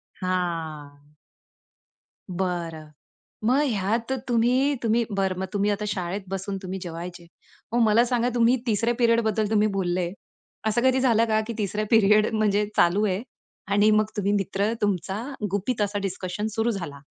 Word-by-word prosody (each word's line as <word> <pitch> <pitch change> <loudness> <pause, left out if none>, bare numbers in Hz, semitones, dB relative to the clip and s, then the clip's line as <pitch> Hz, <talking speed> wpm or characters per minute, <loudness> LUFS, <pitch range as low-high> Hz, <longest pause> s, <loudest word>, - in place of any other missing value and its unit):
हां. 160 -6 -4 1.2
बरं. 170 -4 -3 0.6
मग 255 +5 +4
ह्यात 225 +2 -1 0.2
तुम्ही, 250 +4 +2
तुम्ही 230 +1 +2
बरं 195 -2 0
मग 190 - -1
तुम्ही 205 0 +1
आता 205 +1 -2
शाळेत 195 -1 -3
बसून 195 +1 -3
तुम्ही 190 0 -5
जेवायचे. 175 0 -7 0.5
मग 240 - +3
मला 220 +2 +5
सांगा 245 0 +1
तुम्ही 235 +1 +4
3ऱ्या 230 +2 +1
पिरियडबद्दल 225 -3 +2
तुम्ही 215 -1 +3
बोलले. 175 -2 -1 0.6
असं 220 +2 +1
कधी 260 0 +4
झालं 230 -3 +3
का, 220 -1 +2
की 230 - -3
3रा 210 0 -1
पिरियड 215 -1 +5
म्हणजे 210 -1 +2
चालू 190 +5 +4
आहे. 190 0 0 0.5
आणि 205 +2 +4
मग 215 0 +4
तुम्ही 200 0 +1
मित्र 200 +1 0
तुमचा 195 0 -1 0.3
गुपित 210 +3 -1
असा 205 0 0
डिस्कशन 195 +2 -3
सुरू 225 +1 +1
झाला. 170 -9 -6
205 Hz, 145 wpm, -25 LUFS, 185-225 Hz, 1.2 s, मला